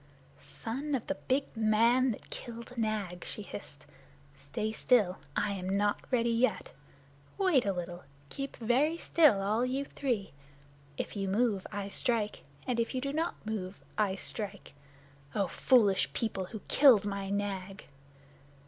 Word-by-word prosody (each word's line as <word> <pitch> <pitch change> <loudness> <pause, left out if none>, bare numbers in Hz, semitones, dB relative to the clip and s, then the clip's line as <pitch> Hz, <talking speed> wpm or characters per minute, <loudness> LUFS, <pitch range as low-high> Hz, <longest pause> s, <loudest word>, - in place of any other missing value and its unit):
"Son 275 +6 -3
of 245 - -3
the 285 - -1
big 270 -1 -1
man 230 +4 +4
that 210 - -9
killed 235 +1 -7
Nag," 215 -6 -2
she 210 - -3
hissed, - - -10 0.5
"stay 220 -2 -3
still. 215 -4 +3 0.2
I 205 0 +1
am 190 0 -1
not 205 0 +2
ready 235 -2 +2
yet. 235 +3 +1 0.7
Wait 360 - +3
a - - +3
little. 175 -1 -5 0.2
Keep 275 - -5
very 265 +8 +2
still, 300 -14 +4
all 215 +4 +1
you 265 +2 -1
three! 240 -9 -2 0.7
If - - -4
you 195 -1 -2
move 205 -1 +1
I 200 -1 -3
strike, 215 +1 0 0.2
and 245 -2 0
if 230 +3 -1
you - - +1
do 275 +1 -2
not 320 -4 -2
move 200 -3 -4 0.2
I 205 -3 +1
strike. 200 -2 -5 0.6
Oh, 200 - +2
foolish 195 - +3
people, 200 -2 -2
who 215 +3 -8
killed 250 -8 +6
my 200 -1 -3
Nag!" 195 -1 -3
220 Hz, 150 wpm, -31 LUFS, 200-250 Hz, 0.7 s, killed